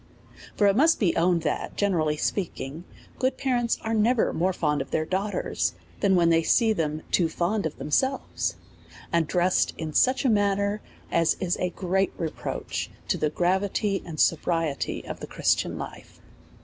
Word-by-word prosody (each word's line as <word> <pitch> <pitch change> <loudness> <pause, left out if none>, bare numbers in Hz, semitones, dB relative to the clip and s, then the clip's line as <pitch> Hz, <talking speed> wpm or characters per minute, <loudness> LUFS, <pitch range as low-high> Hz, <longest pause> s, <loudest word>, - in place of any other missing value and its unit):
For 205 - +3
it 200 -1 +4
must 315 +7 +4
be 185 -6 +2
owned, 170 -1 +2
that, 150 - -2
generally 160 -7 +1
speaking, 165 -3 -3 0.3
good 260 +1 +1
parents 240 -3 0
are 225 - -1
never 225 +2 +2
more 180 +3 +1
fond 150 -5 0
of 135 - -6
their 155 - 0
daughters, 195 +4 -1 0.2
than 195 -2 +3
when 170 -2 +4
they 165 0 +4
sec 220 +6 +3
them 155 -3 -2
too 170 -3 +3
fond 180 +3 0
of 155 - -9
themselves, 265 - -1 0.6
and 165 -2 +2
dressed 180 +1 +2
in 155 -2 -5
such 260 - +3
a - - +5
manner, 200 -1 +1 0.3
as 165 -1 +3
is 180 -1 0
a 180 - 0
great 190 +2 0
reproach 160 -2 -4 0.2
to - - +2
the 150 - +1
gravity 190 +4 0
and 160 -3 -8
sobriety 165 -3 0
of - - -6
the - - -7
Christian - - 0
life. - - -9
185 Hz, 165 wpm, -26 LUFS, 165-205 Hz, 0.6 s, a